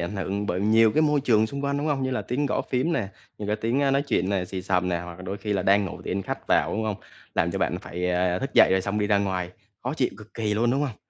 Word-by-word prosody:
ảnh 85 +4 -3
hưởng 100 +2 -2
bởi 90 -1 -1
nhiều 110 +1 +4
cái 155 - +3
môi 150 -2 +3
trường 110 -5 +3
xung 140 +4 -5
quanh, 140 0 0
đúng 145 - -2
hông? 145 -3 0
Như 130 - -1
là 130 - -1
tiếng 140 +4 -1
gõ - - 0
phím 130 +7 +1
nè, 110 -11 -1 0.3
như 105 - -5
cái 105 +1 0
tiếng, 115 +5 0
á, 140 -1 +3
nói 140 +1 +2
chuyện 110 -7 +1
nè, 95 -2 0
xì 95 +1 -5
xầm 90 -1 +1
nè, 85 -1 0
hoặc 85 0 -8
là 90 - -11
đôi 95 +2 -4
khi 105 +1 -3
là 95 -2 0
đang 100 +2 +4
ngủ 90 -1 -6
thì - - -4
anh 95 +1 -1
khách - - -5
vào, - - +3
đúng 110 - -1
hông? 105 -2 -1 0.4
Làm - - +2
cho - - -3
bạn - - 0
phải, 90 +1 -3
à, 90 0 +1
thức 135 - -3
dậy - - +8
rồi 95 - +3
xong 100 +2 -2
đi 105 - +1
ra 100 -1 +3
ngoài, 95 -3 -1 0.3
khó 130 +4 -2
chịu 130 -5 +1
cực 110 +1 -14
kỳ 110 -2 -1
luôn, 115 +3 +2
đúng 135 +3 +1
hông? 135 -7 -2
105 Hz, 320 wpm, -25 LUFS, 95-130 Hz, 0.4 s, dậy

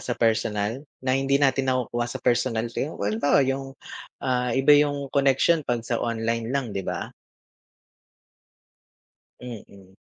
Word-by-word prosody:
sa 120 - -3
personal, 110 0 0 0.2
na 130 - +1
hindi 135 +1 +2
natin 135 -1 +2
nakukuha 120 -2 -1
sa - - -5
personal 120 -2 +1
kayo? 150 - -3
Well, 100 +1 -1
halimbawa 140 +4 +3
yung, 135 0 -3 0.5
ah, 125 -1 +1
iba 135 +2 +5
'yung 145 -2 +2
connection 140 +4 +3
'pag 120 -4 -2
sa 115 0 -1
online 115 0 -1
lang 130 -5 -2
'di 100 - -2
ba? - - -4 2.3
Mm. 100 -6 -11
125 Hz, 135 wpm, -25 LUFS, 115-135 Hz, 2.3 s, iba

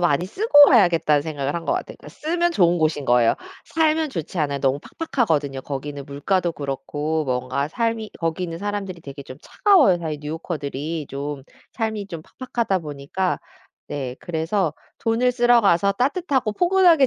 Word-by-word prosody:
많이 175 -1 +2
쓰고 290 - +6
와야겠다.'는 170 - +4
생각을 145 -2 -3
한 170 - -3
것 - - 0
같아요. - - -3
그러니까 - - -12
쓰면 345 +3 -1
좋은 175 - +4
곳인 155 -3 0
거예요. 120 -2 +4 0.3
살면 315 -2 +1
좋지 170 - -5
않아요. 145 -2 0
너무 135 0 +1 0.2
팍팍하거든요. 155 - 0
거기는 140 0 -5
물가도 170 +6 0
그렇고 150 +2 -3
뭔가 130 +2 -1
삶이 230 +2 -2
거기 165 +2 -2
있는 165 -1 -4
사람들이 200 -3 -4
되게 140 -1 -9
좀 130 -1 -10
차가워요, 330 - +4
사실 155 -3 -4
뉴욕커들이 150 -1 -4
좀 140 0 -5 0.3
삶이 220 -3 -2
좀 165 -4 -7 0.2
팍팍하다 235 -7 0
보니까. 150 +5 -2 0.5
네. 130 -3 -4
그래서 165 +1 -1 0.3
'돈을 235 +2 +2
쓰러 240 0 +5
가서 200 0 +3
따뜻하고 265 - 0
포근하게 350 - +5
170 Hz, 385 characters per minute, -22 LUFS, 145-230 Hz, 0.5 s, 쓰고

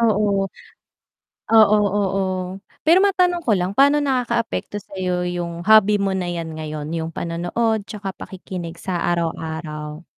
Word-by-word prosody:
Oo. 205 -3 +2 1.0
Oo, 215 -1 +7 0.2
oo, 195 -1 0 0.6
pero 345 +4 +6
matanong 360 -3 +2
ko 230 - +2
lang 185 +2 -2
paano 285 +2 +5
nakakaapekto 240 -6 -1
sayo 185 -2 -3
yung 170 -1 -4
hobby 210 -1 +6
mo 195 -1 0
na 185 - -2
yan 165 -2 -4
ngayon, 155 -1 -5
yung 160 0 -3
panonood 175 +7 -1
'tsaka 195 -3 -6
pakikinig 175 -3 -7
sa 180 -2 -2
araw-araw? 160 -1 -4
195 Hz, 130 wpm, -21 LUFS, 170-220 Hz, 1.0 s, Oo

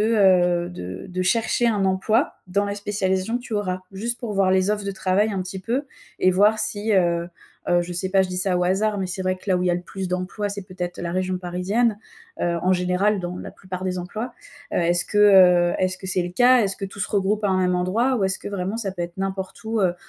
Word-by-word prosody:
heu, 185 -5 +3
de 95 - -7
de 185 0 -2
chercher 225 +5 +1
un 205 -4 +1
emploi 215 +7 +1
dans 200 +3 0
la 200 - -3
spécialisation 200 +1 -1
que 245 - -6
tu 230 - -6
auras? 185 -3 -1
Juste 235 +5 -3
pour 230 -4 -4
voir 195 -1 +3
les 190 +1 +3
offres 210 -1 -1
de 200 - -2
travail 195 +3 +1
un 190 - -2
petit 185 +1 -6
peu 245 +8 -1 0.3
et 185 - +4
voir 205 +4 +4
si, 210 +1 -1
heu 170 -2 +2 0.4
heu, 175 0 +3
je 175 +1 -6
sais 180 +2 -2
pas, 190 0 +4
je 185 - -3
dis 180 - -3
ça 185 -1 +1
au 180 - +1
hasard, 205 +3 +1
mais 190 - -1
c'est 185 +1 -5
vrai 185 0 0
que - - -19
là 185 - +3
où - - -1
il - - 0
y - - +3
a - - +2
le 175 - -3
plus 190 0 -5
d'emplois, 185 +3 -2
c'est 200 0 -5
peut-être 180 -2 -6
la 170 0 -3
région 185 0 -1
parisienne. 195 +5 0 0.4
Heu, 170 -1 0
en 185 +1 +3
général 185 +3 +1
dans 175 0 -5
la - - -7
plupart 185 0 -7
des 185 -1 -2
emplois. 215 +7 -5 0.4
Heu, - - -1
est-ce 175 0 +2
que, 205 - -2
heu, 180 -4 +6
est-ce 185 0 0
que 190 - -8
c'est 185 -1 +1
le 175 - -4
cas? 245 +3 +5
Est-ce 195 -1 0
que 195 - -4
tout 200 - -10
se - - -1
regroupe 205 +1 0
à - - +3
un 185 - +2
même 180 0 +2
endroit? 225 +9 +1
Ou 195 - 0
est-ce 190 0 0
que - - -7
vraiment 200 +2 -3
ça 195 -5 -3
peut 175 -2 -4
être 170 +1 -6
n'importe 190 +1 -4
où, 220 -1 -1
heu, 180 -2 +2
190 Hz, 265 wpm, -23 LUFS, 180-205 Hz, 0.4 s, heu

